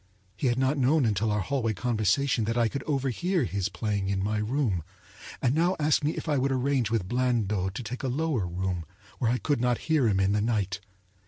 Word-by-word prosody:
He 135 - -1
had 120 0 +1
not 135 +2 +1
known 135 +2 +3
until 110 0 +1
our 105 0 +1
hallway 120 -1 -1
conversation 115 +3 +1
that 115 +2 -1
I 120 -1 +3
could 140 +5 -4
overhear 150 - 0
his 100 -5 -1
playing 100 -3 -2
in 95 -1 0
my 105 +1 0
room, 105 - 0 0.6
and 130 -1 +3
now 170 +4 +2
asked 150 0 +2
me 145 - +2
if - - -5
I 145 -3 +2
would 135 +1 +1
arrange 130 -3 +1
with 110 -5 -1
Blandot 105 -6 0
to 125 - -4
take 120 +3 -5
a 135 - -2
lower 130 - 0
room 90 0 -2 0.4
where 115 - +1
I 125 - +2
could 145 -2 0
not 125 -1 +2
hear 145 -7 +4
him 100 -3 +2
in 95 0 +2
the 105 0 +1
night. 100 -4 0
120 Hz, 220 wpm, -27 LUFS, 105-135 Hz, 0.6 s, hear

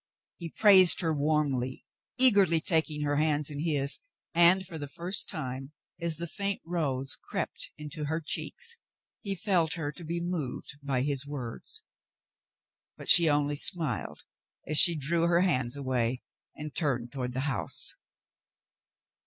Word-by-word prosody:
He 170 -1 -6
praised 190 -3 +7
her 165 -2 0
warmly, 145 -4 -1 0.3
eagerly, 200 -10 +4
taking 160 -2 +2
her 145 0 -1
hands 150 -1 +1
in 145 - -6
his, 145 -3 +1 0.3
and 175 +3 +5
for 170 -4 -9
the 145 - -6
first 175 +7 -1
time, 135 -4 -6 0.3
as 170 -2 -2
the 170 - -4
faint 200 +3 -3
rose 140 -6 -2
crept - - -5
into 150 0 -6
her 160 +3 -2
cheeks, 465 - -4 0.4
he 200 -2 -3
felt 170 -4 0
her 160 -4 -4
to 170 +4 -13
be 170 +2 -4
moved 160 -5 -4
by 135 -2 -1
his 140 0 -2
words; 130 -5 -7 1.1
but - - -8
she 170 -2 +8
only 145 0 0
smiled 160 +2 -2 0.4
as 155 0 +3
she 175 -3 +9
drew 165 +4 +1
her 170 0 +2
hands 130 -8 0
aw^ay 130 -2 -2 0.3
and 150 -1 -8
turned 125 -6 -2
toward 125 -3 -5
the 130 - -3
house. 135 -6 -1
150 Hz, 145 wpm, -28 LUFS, 140-170 Hz, 1.1 s, she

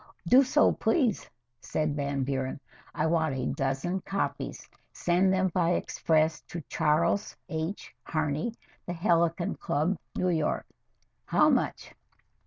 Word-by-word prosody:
"Do 255 +2 +8
so, 260 - +4
please," 255 - +1 0.3
said 155 -2 -1
Van 140 -1 -1
Buren. 130 0 -2 0.4
"I - - 0
want 160 -3 +1
a 130 - -2
dozen 135 +8 -1
copies 195 +2 -3 0.2
send 180 +2 +2
them 190 0 +2
by 175 0 +1
express 160 -2 +1
to 175 - -6
Charles 170 +6 +1
H. 160 +4 -4
Harney, 155 +8 -2 0.3
The 175 - -2
Helicon 170 +1 +1
Club, 160 +5 0 0.2
New 185 - +1
York. 160 -3 0 0.6
How - - +4
much?" - - -1
165 Hz, 125 wpm, -28 LUFS, 150-185 Hz, 0.6 s, Do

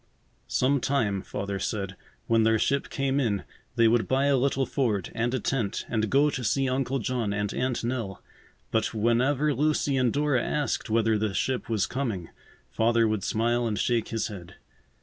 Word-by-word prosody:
Some 135 +2 +2
time, 110 -9 0
Father 100 +1 -4
said, 95 -2 -3 0.3
when 115 -1 +3
their 110 0 +4
ship 140 +5 0
came 135 0 0
in, 105 -7 0 0.3
they 115 -2 +5
would 110 -2 +2
buy 135 +1 +2
a 140 -1 +4
little 135 +1 +1
Ford, 115 -8 -1
and 120 +1 0
a - - 0
tent, 115 -3 -2
and 110 -2 0
go 145 +2 +4
to 130 - -4
see 135 +5 +1
Uncle 130 +1 0
John 120 -4 -1
and 105 0 -2
Aunt 125 -2 -1
Nell. 115 -6 -3 0.5
But 110 +1 0
whenever 130 +7 +2
Lucy 145 0 +1
and 125 -2 +2
Dora 145 -2 +1
asked 145 -4 -1
whether 110 -1 +2
the 105 -2 -1
ship 130 -2 -1
was 110 -3 +1
coming, 115 -11 -3 0.4
Father 115 - +3
would 110 -2 -1
smile 120 +2 +1
and 105 -2 -2
shake 120 0 +1
his 115 -1 -2
head. 90 -5 -8
120 Hz, 180 wpm, -27 LUFS, 110-135 Hz, 0.5 s, they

